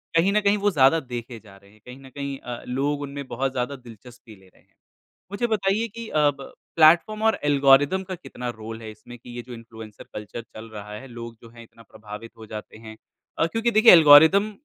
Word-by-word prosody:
कहीं 175 +4 +3
न 210 - +2
कहीं 205 +1 +2
वो 205 0 +1
ज़्यादा 145 +1 +4
देखे 120 -3 -8
जा 100 -3 -17
रहे 100 +1 -22
हैं। 110 - -23
कहीं 125 +2 -11
न 135 - -14
कहीं 140 0 -6
अ, 120 -1 -8
लोग 140 +3 -2
उनमें 140 0 -7
बहुत 135 +2 -2
ज़्यादा 130 +2 -3
दिलचस्पी 120 -2 -15
ले 95 -1 -22
रहे - - -26
हैं। - - -37 0.6
मुझे 240 +4 -2
बताइए 210 +1 0
कि 230 +1 -9
अब 145 -2 +1 0.3
प्लेटफ़ॉर्म 170 +7 +4
और 220 - +2
एल्गोरिदम 145 +5 +3
का 185 0 -6
कितना 125 -8 -9
रोल 110 +1 -9
है 110 - -8
इसमें 120 +3 -14
कि 120 - -16
ये 120 - -5
जो 125 - -11
इन्फ्लुएन्सर 115 -2 -12
कल्चर 105 +2 -7
चल 110 0 -13
रहा 105 -1 -10
है, 135 +6 -9
लोग 115 -1 -9
जो 115 - -13
हैं 115 0 -14
इतना 115 0 -19
प्रभावित 105 +1 -11
हो 110 - -11
जाते 110 0 -9
हैं? 110 0 -12 0.4
अ, - - +3
क्योंकि 225 +4 -1
देखिए 220 +1 +7
एल्गोरिदम 160 +6 +7
130 Hz, 215 wpm, -23 LUFS, 115-165 Hz, 0.6 s, देखिए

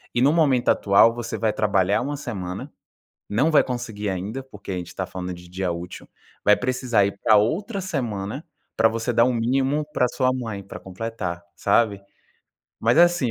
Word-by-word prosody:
E 120 - +2
no 140 +3 +5
momento 140 -7 +3
atual 105 +3 +5
você 120 0 -4
vai 110 -2 +1
trabalhar 100 -2 +2
uma 145 +3 -3
semana, 95 -9 -6 0.6
não 135 +10 +2
vai 150 - +6
conseguir 115 -5 -4
ainda, 100 +8 -4
porque 105 -6 -10
a - - -2
gente 90 -1 -5
está 95 - -4
falando 90 0 -5
de 90 0 -12
dia 90 -1 -2
útil, 85 +1 -7 0.4
vai 105 0 +7
precisar 125 -5 +1
ir 100 - -3
pra 110 -1 +6
outra 195 - 0
semana 125 - -3 0.3
pra 110 0 +5
você 115 +2 -2
dar 115 - +5
o 125 - +2
mínimo 135 +5 +1
pra 125 - +2
sua 130 -1 +1
mãe 110 -6 -5
pra - - -9
completar, 95 -3 -5
sabe? 100 -1 +2 0.8
Mas 115 +5 +3
é - - +9
assim, 175 -9 +1
115 Hz, 185 wpm, -23 LUFS, 100-130 Hz, 0.8 s, é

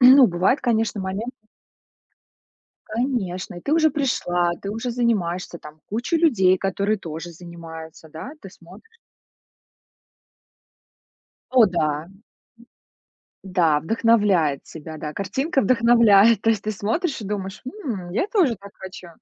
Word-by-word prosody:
ну, 260 +1 +9
бывает, 185 +8 +1
конечно, 225 -3 0
моменты 195 +6 -4 1.5
Конечно, 215 -7 -2
и - - -8
ты 280 - -2
уже 315 -1 +4
пришла, 175 - 0
ты 200 - -5
уже 225 +4 -3
занимаешься, 190 -8 -1
там 150 0 -13
куча 235 - -1
людей, 215 - +4
которые 200 +2 -1
тоже 165 0 -7
занимаются, 165 -2 -11
да? 160 - -8
Ты 195 - -11
смотришь 185 - -17 2.5
О 250 -3 +6
да. 155 -4 -1
М. 195 +3 -20 1.2
Да, 175 -6 +2
вдохновляет 200 -6 +2
тебя. 160 0 -9
Да, 150 0 -6
картинка 265 - -1
вдохновляет. 230 -2 +5
То 225 - +2
есть 220 -3 +1
ты 215 - -1
смотришь 225 - -2
и - - -6
думаешь: 195 -1 -5 0.2
"М, 195 -10 -4
я 225 - 0
тоже 370 - +2
так 200 0 -13
хочу". 185 -2 -10
200 Hz, 130 wpm, -23 LUFS, 175-235 Hz, 2.5 s, ну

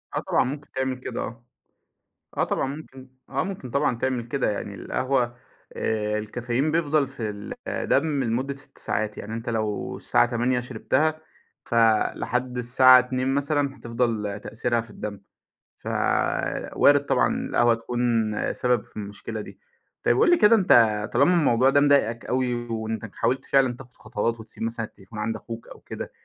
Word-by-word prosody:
آه، - - +1
طبعًا - - +1
ممكن 145 +3 -6
تعمل 130 -1 -2
كده، 125 - -5
آه، 115 +1 -7 0.9
آه - - +2
طبعًا - - -1
ممكن، 130 -4 -12 0.2
آه - - -1
ممكن 185 -10 -6
طبعًا 140 -2 +1
تعمل 130 -2 -1
كده، 130 +1 -1
يعني 100 0 -4
القهوة 125 +2 -1 0.4
آآ، 105 -1 -1
الcaffeine 120 +3 -8 0.3
بيفضَل 155 -3 +2
في 120 -5 -5
ال 105 0 -7
الدم 140 -2 +1
لمدّة 130 +5 -1
6 135 - -10
ساعات، 105 0 -2
يعني 110 +2 -6
أنت 115 +1 -5
لو 110 -2 -2
الساعة - - +2
20:00 125 +1 0
شرِبتها 130 +6 0 0.4
فلحد 120 +2 +1
الساعة 130 +1 +7
02:00 130 +1 0
مثلًا 140 -1 0
هتفضَل 115 -4 -2
تأثيرها 115 +2 -1
في 115 - -12
الدم، 105 -1 -6 0.6
فوارِد 145 0 +1
طبعًا - - +2
القهوة 120 -1 +4
تكون 120 +1 -3 0.5
سبب 125 -3 +1
في - - -15
المشكلة 105 +1 -6
دي، - - -11 0.4
طيّب 120 - +3
قُل - - +5
لي 350 - +6
كده 210 +2 +6
أنت 110 - +4
طالما 140 +8 +4
الموضوع 130 -7 +4
ده 140 +1 +4
مضايقك 140 -5 +3
اوي 125 -1 0 0.2
وأنت 110 -1 -3
حاولت 130 +2 0
فعلًا 135 -3 +3
تاخد 125 -1 -14
خطوات 115 +1 -2
وتسيِب 110 0 -8
مثلًا 115 0 -2
التليفون 105 +1 -12
عند 110 +1 -1
أخوك 115 0 -8
أو - - -12
كده، - - -7
120 Hz, 160 wpm, -25 LUFS, 115-135 Hz, 0.9 s, الساعة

